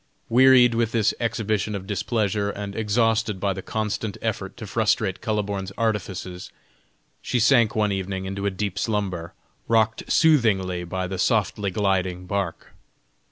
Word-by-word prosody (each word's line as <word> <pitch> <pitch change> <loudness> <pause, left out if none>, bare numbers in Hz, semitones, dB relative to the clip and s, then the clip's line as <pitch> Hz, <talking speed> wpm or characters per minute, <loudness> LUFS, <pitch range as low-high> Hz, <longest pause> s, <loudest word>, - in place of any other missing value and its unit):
Wearied 125 0 +6
with 115 -1 0
this 110 -3 +2
exhibition 110 -3 -1
of 95 -1 -6
displeasure, 105 0 -1
and 100 -1 -6
exhausted 110 -1 +1
by 100 0 0
the 95 - -6
constant 110 0 -3
effort 105 -3 -4
to 115 - -7
frustrate 110 -2 0
Kuhleborn's 100 -3 -2
artifices, 95 -5 -3 0.7
she 125 - -1
sank 115 -1 +4
one 105 -2 +2
evening 95 0 -3
into 100 +1 -3
a - - +3
deep 100 0 -3
slumber, 95 -6 -2 0.3
rocked 110 -1 +1
soothingly 100 - +3
by 95 +2 -3
the 90 0 -5
softly 105 -2 +1
gliding 95 -2 -1
bark. 95 -2 -4
105 Hz, 140 wpm, -24 LUFS, 95-110 Hz, 0.7 s, Wearied